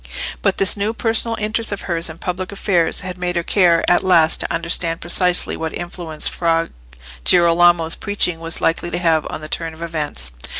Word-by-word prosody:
But - - 0
this 195 - +2
new 210 +2 -2
personal 225 0 0
interest 220 +1 +1
of 200 - -4
hers 170 -2 -2
in 160 - -9
public 180 +2 -5
affairs 195 -4 0
had 185 -1 -7
made 180 0 -2
her 170 - -1
care 170 -3 +2
at 175 - +3
last 165 -4 +4
to - - -3
understand 165 0 -1
precisely 180 +1 +4
what 160 -1 -5
influence 175 -3 -4
Fra 165 -1 0 0.5
Girolamo's 170 - +3
preaching 200 -5 -1
was 165 0 -2
likely 165 +1 0
to - - -3
have 165 -3 +1
on - - -6
the 155 - -8
turn 165 +1 -4
of 160 - -15
events. 150 - -4
170 Hz, 185 wpm, -18 LUFS, 165-185 Hz, 0.5 s, last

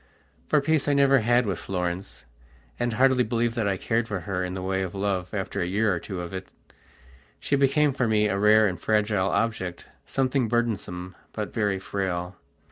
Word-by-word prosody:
For 150 - +3
peace 155 0 +1
I 145 - +3
never 140 -1 +5
had 120 +2 +3
with 95 -4 -2
Florence, 90 -2 -4 0.5
and 120 -1 0
hardly 130 +1 +4
believe 120 0 0
that 115 -3 -1
I 95 -1 0
cared 115 +4 0
for 100 -5 -3
her 95 -2 -2
in 90 0 -4
the 95 - -4
way 95 0 -1
of 95 0 -4
love 95 -2 -1
after 95 -2 -3
a 90 - 0
year 105 +2 +1
or 90 - -2
two 95 -1 -6
of 85 +1 -7
it. 95 0 -6 0.9
She 145 - 0
became 140 +1 +3
for 125 -2 0
me 105 -1 +3
a 100 -1 -1
rare 110 +1 +6
and 95 -3 -2
fragile 105 -3 +1
object, 95 -7 -2 0.2
something 130 -2 +1
burdensome, 100 -6 -2 0.2
but - - -4
very 105 -3 0
frail. 95 -2 -3
105 Hz, 195 wpm, -26 LUFS, 95-120 Hz, 0.9 s, rare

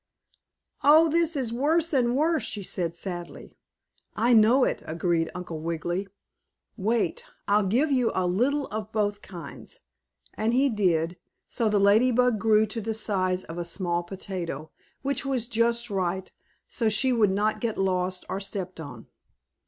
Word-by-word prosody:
"Oh, 315 +3 +6
this 335 0 +1
is 250 -5 -1
worse 320 +6 +1
and 245 -2 +2
worse," 315 +1 +2
she 210 -2 -3
said 170 -2 -2
sadly. 175 -1 -7 0.6
"I 240 +2 +3
know 230 +4 +6
it!" - - 0
agreed 165 0 0
Uncle 175 -3 -6
Wiggily. 170 +4 -3 0.7
"Wait, 220 +3 -1 0.2
I'll 205 -1 +3
give 265 +10 +2
you 250 -4 +2
a 185 - +1
little 255 +11 +1
of 215 0 -5
both 205 -1 -1
kinds," 175 -5 -10 0.5
and 225 +2 0
he 275 +2 +3
did, 175 -6 +1 0.3
so 225 -2 0
the 210 - +2
Lady 205 +5 +5
Bug 250 -2 +2
grew 220 0 +4
to 225 +2 -4
the 220 +1 -3
size 185 -4 0
of 165 +1 -7
a - - -1
small 175 0 -1
potato, 175 -4 -6 0.3
which 280 -1 -1
was 260 -4 -1
just 235 0 +1
right, 190 -1 -2 0.4
so 225 -2 0
she 255 +5 +2
would 220 -4 +3
not 205 +3 0
get 230 -3 -2
lost 185 -1 -1
or 195 - -3
stepped 195 -3 -5
on. 125 -7 -9
210 Hz, 160 wpm, -26 LUFS, 180-240 Hz, 0.7 s, Oh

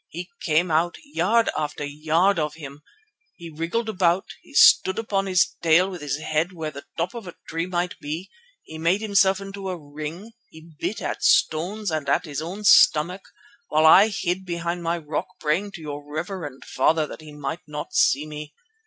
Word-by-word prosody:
He 175 +3 -7
came 165 +2 +1
out, 165 +2 +2
yard 230 - +1
after 150 -1 -3
yard 160 +6 +1
of 150 -1 -2
him. 145 -2 -10 0.5
He 170 -1 -10
wriggled 170 +9 -2
about, 185 -3 +1 0.2
he - - -18
stood 190 - +6
upon 200 -3 -1
his 185 -1 +2
tail 170 +4 +4
with 180 -4 -8
his 145 -2 -2
head 155 +3 -1
where 160 -3 -5
the 140 -1 -10
top 170 +2 -1
of 230 -5 -8
a 175 - -9
tree 165 +2 -3
might 180 0 -2
be, 155 +6 -6 0.3
he 160 - -10
made 170 +6 +2
himself 195 -2 +3
into 195 -1 -6
a 180 - -3
ring, 155 +7 -8 0.2
he 160 +1 -15
bit 220 - -3
at - - -3
stones 180 +6 +2
and 155 -3 -2
at - - +2
his 150 -2 -4
own 185 +6 -6
stomach, 180 -2 +5 0.5
while 155 +1 +2
I 190 +6 +8
hid 190 -3 -2
behind 170 -1 -3
my 170 0 -1
rock 155 -2 -4
praying 190 +7 -1
to 170 - -9
your 145 -1 -6
reverend 155 -1 -6
father 160 -1 +2
that 150 - -10
he 155 -1 -11
might 150 +2 -5
not 150 0 -6
see 145 +3 +3
me. 150 0 -8
170 Hz, 190 wpm, -24 LUFS, 155-190 Hz, 0.5 s, I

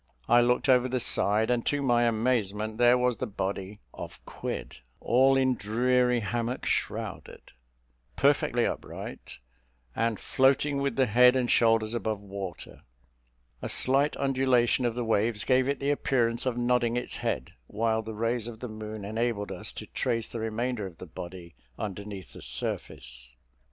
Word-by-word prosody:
I 120 0 +6
looked 125 +3 +2
over 130 -1 +4
the 130 0 0
side, 110 -1 +2
and, 120 -1 +1
to 145 - +1
my 120 -2 +3
amazement 110 -2 0
there 120 +1 +6
was 125 -1 +1
the 130 - -3
body 100 0 -4
of - - -8
Quid, - - -6 0.2
"All 135 +2 +4
in 130 -1 +3
dreary 125 +2 +1
hammock 120 +3 -2
shrouded," - - -3 0.6
perfectly - - +2
upright, - - -6 0.6
and 115 -2 0
floating 140 +2 +2
with 140 -4 -1
the 130 - +3
head 125 +3 +6
and 125 -2 +1
shoulders 115 -1 +3
above 110 -3 -2
water. 100 -3 -8 0.8
A - - -4
slight 135 +3 +2
undulation 130 -2 +2
of 120 -1 0
the 120 -1 -2
waves 110 0 +1
gave 130 0 +3
it 140 0 -1
the 140 +1 +1
appearance 120 -4 +1
of 125 -2 -1
nodding 120 -1 +1
its 125 - -3
head; 65 - -3
while 110 +1 0
the 110 0 -7
rays 115 +1 -1
of 115 -2 -8
the 125 - -6
moon 110 -1 -7
enabled 110 -1 -2
us - - -4
to - - -7
trace 115 -2 -1
the 115 - -6
remainder 110 -1 -2
of 85 -3 -13
the - - -9
body 85 0 -9 0.2
underneath 100 -2 -6
the - - -11
surface. - - -3
115 Hz, 160 wpm, -28 LUFS, 105-125 Hz, 0.8 s, I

